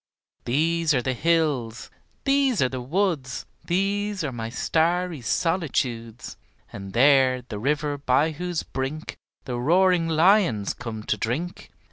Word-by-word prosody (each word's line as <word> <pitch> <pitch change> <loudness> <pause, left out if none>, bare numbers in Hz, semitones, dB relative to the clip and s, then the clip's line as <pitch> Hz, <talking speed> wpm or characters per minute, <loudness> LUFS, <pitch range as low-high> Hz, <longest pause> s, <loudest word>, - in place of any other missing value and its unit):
These 160 +4 +1
are 125 - +2
the 130 - 0
hills, 145 -6 0 0.3
these 275 -4 +2
are 130 - +3
the 130 -1 -5
woods, 150 -3 -1 0.2
These 200 +2 -1
are 145 - -2
my 115 -2 -5
starry 165 +4 0
solitudes; 125 - -2 0.4
And 95 -1 -8
there 130 -1 +4
the 110 -4 -7
river 145 +3 -1
by 140 +3 +2
whose 175 +2 -3
brink 135 +4 -5 0.3
The 120 -2 -3
roaring 175 +4 +3
lions 165 - +3
come 110 -2 -7
to 105 - -1
drink. 135 - -4
150 Hz, 130 wpm, -24 LUFS, 125-175 Hz, 0.4 s, there